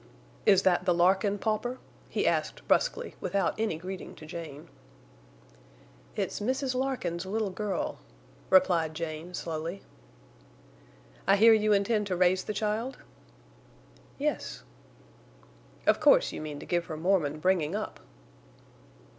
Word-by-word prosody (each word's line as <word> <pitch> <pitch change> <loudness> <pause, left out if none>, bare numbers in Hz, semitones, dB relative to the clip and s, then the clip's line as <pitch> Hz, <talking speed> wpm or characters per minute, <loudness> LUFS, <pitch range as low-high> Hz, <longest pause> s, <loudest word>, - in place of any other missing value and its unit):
"Is 195 -2 +6
that 180 -1 +3
the 180 -2 +3
Larkin 190 +3 +3
pauper?" 220 +4 -1 0.3
he - - -1
asked, - - -1
bruskly, - - +1
without 195 -4 0
any 220 -7 0
greeting 185 +2 -7
to 155 - -12
Jane. 155 -2 -8 1.5
"It's - - -2
Mrs. 260 +4 -1
Larkin's 255 -10 -2
little 210 0 -1
girl," 195 -1 -3 0.5
replied 175 -4 +4
Jane, 165 +2 -5
slowly. 165 +3 -4 1.4
"I 195 - +6
hear 225 +3 +7
you 215 -1 +3
intend 210 +1 +2
to 185 - -1
raise 185 +1 +3
the - - -2
child?" 215 +5 -2 1.2
"Yes." - - -2 1.2
"Of - - +4
course - - +5
you - - -6
mean 150 -2 -6
to - - -9
give 175 -1 0
her 155 -3 -6
Mormon 160 -4 +1
bringing 175 0 +1
up?" 215 - -4
190 Hz, 125 wpm, -29 LUFS, 170-215 Hz, 1.5 s, hear